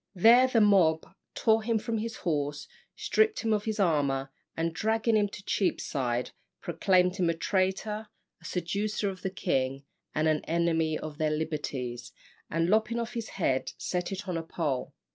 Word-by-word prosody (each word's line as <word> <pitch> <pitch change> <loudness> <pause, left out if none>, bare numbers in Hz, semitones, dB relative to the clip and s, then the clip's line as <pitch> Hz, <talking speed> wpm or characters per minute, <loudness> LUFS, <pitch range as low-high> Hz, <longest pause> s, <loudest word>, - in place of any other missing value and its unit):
There 235 +7 +7
the 240 -3 +3
mob 180 -6 +4 0.3
tore 220 0 +3
him 225 +1 +1
from 225 +1 -2
his 225 +1 -4
horse, 145 -3 -1 0.3
stripped 435 0 +2
him 225 -1 +1
of 210 -1 -1
his 220 -1 -2
armour, 140 -7 +1 0.3
and 165 0 -1
dragging 220 +4 +1
him 210 -1 +3
to 200 - -10
Cheapside, 125 - -1 0.3
proclaimed 180 0 +2
him 175 -3 +2
a 165 - +1
traitor, 195 +4 -1 0.3
a - - -16
seducer 200 +3 -1
of 185 - -11
the 190 - -2
king, 135 -7 -1 0.3
and 155 +1 +2
an 155 -1 +1
enemy 165 -1 +1
of 150 -1 -8
their 155 -1 +2
liberties, 145 -6 -3 0.4
and 165 +1 +1
lopping 220 +4 +2
off 235 +1 -4
his 230 -2 -4
head, 130 -8 0
set 180 0 -2
it 195 +1 -5
on 180 -2 -1
a 165 - -3
pole. 150 -6 -3
180 Hz, 170 wpm, -29 LUFS, 155-215 Hz, 0.4 s, There